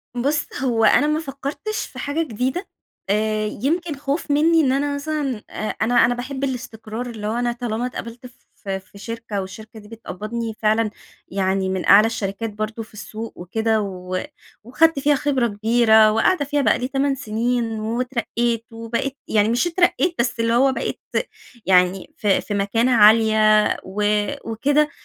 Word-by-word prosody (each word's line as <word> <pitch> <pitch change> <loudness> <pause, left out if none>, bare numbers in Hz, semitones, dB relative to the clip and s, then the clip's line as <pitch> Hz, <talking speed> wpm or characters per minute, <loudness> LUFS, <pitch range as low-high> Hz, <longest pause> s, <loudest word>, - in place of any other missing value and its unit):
بص، 285 +5 0 0.2
هو 235 -4 +1
أنا 290 +7 +5
ما 305 +1 +1
فكرتش 290 +8 -4
في - - -11
حاجة 295 +3 -1
جديدة، 260 - -3 0.4
آآ 215 +1 +1
يمكن 305 - -2
خوف 285 +2 -3
مني 320 +3 +4
إن 270 -4 +2
أنا 285 +2 0
مثلًا، 285 -6 -3
آآ، 215 - -4
أنا 240 +2 +4
أنا 245 - 0
باحب 265 +2 -5
الاستقرار 240 -2 -4
اللي 215 -3 -5
هو 215 - -1
أنا 240 0 0
طالما 240 -1 -3
اتقبلت 240 -1 -7 0.3
ف 200 - -11
في 190 +1 -5
شركة 225 -1 -5
والشركة 220 +4 -10
دي 210 - -15
بتقبضني 225 +1 -5
فعلًا 220 0 +2 0.4
يعني 190 0 0
من 190 -1 -2
أعلى 205 +2 +7
الشركات 225 0 -3
برضو 215 +2 -4
في 220 - -19
السوق 220 +2 -7
وكده 220 +5 0
و 185 -2 -4 0.4
وأخدت 305 +6 +3
فيها 290 +1 +3
خبرة 270 -3 +1
كبيرة، 220 0 +4
وقاعدة 285 +9 +2
فيها 290 +1 0
بقى - - +2
لي 250 - -2
8 275 +1 0
سنين، 230 -1 -1
واترقيت 235 0 -1
وبقيت 230 +4 -3
يعني 210 0 +2
مش 245 +9 +1
اترقيت 350 0 +1
بس 235 -1 0
اللي 230 0 +1
هو 265 +3 +4
بقيت - - -4 0.6
يعني 180 0 +2
ف 210 - -4
في 205 +1 +1
مكانة 205 +5 +1
عالية 215 -1 +5 0.2
و 195 +3 -4 0.5
وكده. 290 +6 +2
230 Hz, 160 wpm, -21 LUFS, 215-270 Hz, 0.6 s, أعلى